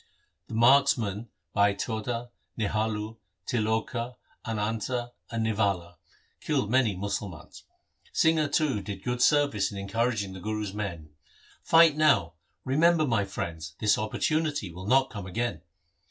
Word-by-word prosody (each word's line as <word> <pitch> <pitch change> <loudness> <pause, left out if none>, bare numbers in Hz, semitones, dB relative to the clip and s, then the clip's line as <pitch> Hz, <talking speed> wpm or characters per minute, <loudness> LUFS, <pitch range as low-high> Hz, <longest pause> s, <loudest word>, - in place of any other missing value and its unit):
The 115 - -6
marksmen 115 -3 +3 0.2
Bhai 100 -1 +3
Tota, 115 +3 -3 0.3
Nihalu, 110 0 -1 0.3
Tiloka, 115 +2 -1 0.3
Ananta, 115 +2 -2 0.2
and 115 -1 -2
Nivala, 100 -5 0 0.4
killed 105 - -1
many 125 -6 +3
Musalmans. 100 -3 -5 0.5
Singha, 160 -2 +3
too, 140 -6 +1
did 95 0 -7
good 125 0 -2
ser 145 +2 +5
vice 105 -8 -1
in 100 - -7
encouraging 105 0 -1
the 95 - -8
Guru's 105 0 -3
men, 85 -7 -5 0.3
' - - -28
Fight 165 -2 +7
now; 145 - +3 0.3
remember, 155 +4 +4
my 115 -7 +1
friends, 85 -5 -5
this 105 -2 +3
opportunity 145 - -1
will 90 +3 -8
not 135 +2 +3
come 100 -4 -6
again.' 110 -3 -2
110 Hz, 130 wpm, -28 LUFS, 100-125 Hz, 0.5 s, Fight